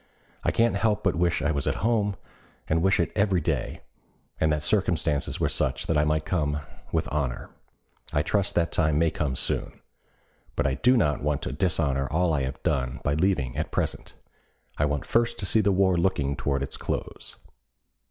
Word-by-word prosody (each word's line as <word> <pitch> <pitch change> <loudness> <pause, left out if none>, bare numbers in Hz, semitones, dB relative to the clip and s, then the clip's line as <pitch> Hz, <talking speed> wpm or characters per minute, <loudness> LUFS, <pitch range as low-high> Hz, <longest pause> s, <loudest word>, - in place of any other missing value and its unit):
I - - +2
can't 115 -3 +2
help 105 0 +1
but 95 - +2
wish 85 -1 +1
I 75 - +2
was 70 -3 -1
at - - +1
home, 105 -4 +1 0.5
and 80 +1 +1
wish 95 +1 +3
it 85 - +1
every 100 -3 +2
day, 75 - -2 0.6
and 80 0 +2
that 75 -1 0
circumstances 85 -6 +1
were - - +2
such 65 0 -1
that 80 - 0
I 75 0 +3
might 75 0 0
come 75 -4 0 0.3
with - - 0
honor. 70 -5 -2 0.6
I 75 - +1
trust 100 +5 0
that 85 -1 +1
time 75 -3 +2
may 80 0 +3
come 70 -4 -2
soon. - - -1 0.8
But - - 0
I 65 - +2
do 125 - +3
not 75 - +1
want 75 -1 -1
to - - -3
dishonor 70 -4 0
all 85 0 +1
I 70 - +1
have 65 0 -4
done 65 -1 -1
by 70 - +1
leaving 75 -6 +1
at - - -2
present. - - -3 0.6
I 75 - +1
want 75 -1 -1
first 115 0 +1
to 100 - -3
see 110 +3 +4
the 100 -1 +2
war 95 -1 +3
looking 70 -6 +1
toward 70 -2 -1
its 70 - -6
close." - - -5
80 Hz, 190 wpm, -26 LUFS, 70-95 Hz, 0.8 s, see